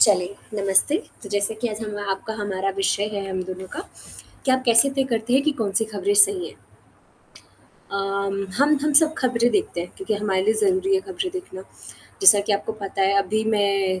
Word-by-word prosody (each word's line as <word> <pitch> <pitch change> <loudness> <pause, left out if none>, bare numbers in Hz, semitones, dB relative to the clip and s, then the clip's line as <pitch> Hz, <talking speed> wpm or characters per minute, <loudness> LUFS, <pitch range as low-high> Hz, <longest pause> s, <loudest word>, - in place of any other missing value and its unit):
चलिए 195 -2 +3 0.3
नमस्ते। 195 +10 +4 0.3
तो 200 - -8
जैसा 205 +2 0
कि 240 - -1
आज 215 0 -6
हम 210 -1 -5
आपका 195 +3 -4
हमारा 195 -1 -2
विषय 195 +1 0
है 200 -1 -4
हम 185 -1 -3
दोनों 185 +1 -7
का - - -7 0.6
कि 265 - +1
आप 260 0 +2
कैसे 235 +3 +5
तय 270 - +2
करते 230 +1 -1
हैं 270 +2 +4
कि 305 - +2
कौन-सी 205 +1 +1
खबरें 405 - 0
सही 405 -2 +4
हैं? - - -16 1.4
अम, 195 0 -2 0.2
हम 295 +2 +4
हम 300 0 +1
सब 315 -1 +1
खबरें 245 -2 +1
देखते 205 -5 -1
हैं 175 - -6
क्योंकि 205 +3 -2
हमारे 200 -2 -1
लिए 220 +2 +2
ज़रूरी 385 - +1
है 380 - +2
खबरें 380 -1 -5
देखना। 365 - -7 0.6
जैसा 385 - +8
कि 205 +1 -1
आपको 205 +2 -2
पता 200 -2 -4
है 195 +1 +2
अभी 210 +3 0
मैं 200 -3 +1
210 Hz, 195 wpm, -22 LUFS, 195-270 Hz, 1.4 s, जैसा